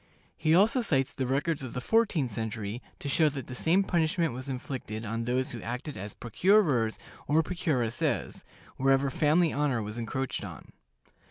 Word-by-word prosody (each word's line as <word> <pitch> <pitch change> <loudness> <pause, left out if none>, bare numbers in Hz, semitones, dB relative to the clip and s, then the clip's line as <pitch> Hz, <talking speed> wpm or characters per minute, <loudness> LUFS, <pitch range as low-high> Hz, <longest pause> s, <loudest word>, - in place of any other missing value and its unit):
He 155 +1 +3
also 220 +7 +4
cites 135 - +1
the 130 -2 -2
records 145 +4 0
of 130 -3 -6
the 125 - -2
fourteenth 170 - +2
century 110 +1 -4 0.2
to - - -6
show 155 +2 +4
that 135 -2 -6
the 130 - -8
same 170 +9 +2
punishment 165 -4 +1
was 130 +3 -6
inflicted 125 -4 -5
on 115 +2 -3
those 130 +2 0
who 120 - -6
acted 125 +5 -5
as 100 +2 -7
procurers 135 - +2 0.3
or 155 +2 +3
procuresses, 150 -10 -1 0.3
wherever 135 +1 +3
family 160 +4 +3
honor 140 -6 0
was 105 +3 -6
encroached 130 +3 -3
on. - - -9
135 Hz, 165 wpm, -29 LUFS, 120-160 Hz, 0.3 s, also